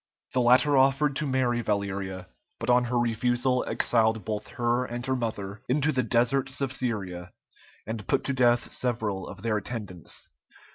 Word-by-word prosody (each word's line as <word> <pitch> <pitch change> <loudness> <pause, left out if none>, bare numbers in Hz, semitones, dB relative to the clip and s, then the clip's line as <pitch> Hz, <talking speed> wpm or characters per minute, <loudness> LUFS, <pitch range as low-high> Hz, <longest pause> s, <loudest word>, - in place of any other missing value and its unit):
The 125 - +2
latter 125 +4 +5
offered 135 +2 +3
to 150 - -1
marry 125 -3 +1
Valeria, 100 -3 -2 0.3
but 115 +2 0
on 125 0 +4
her 120 0 -1
refusal 120 +2 +1
exiled 110 -2 +1
both 105 -1 -3
her 120 +1 +1
and 120 0 -5
her 130 - 0
mother 110 -4 -4
into 150 +4 +2
the 130 -3 +1
deserts 125 +3 +2
of 135 -2 -1
Syria, 95 -9 -2 0.5
and 110 -1 -5
put - - +1
to 140 - 0
death 120 -2 +3
several 110 -6 -2
of - - -10
their 115 -2 +1
attendants. 105 -6 -5
120 Hz, 160 wpm, -27 LUFS, 105-130 Hz, 0.5 s, latter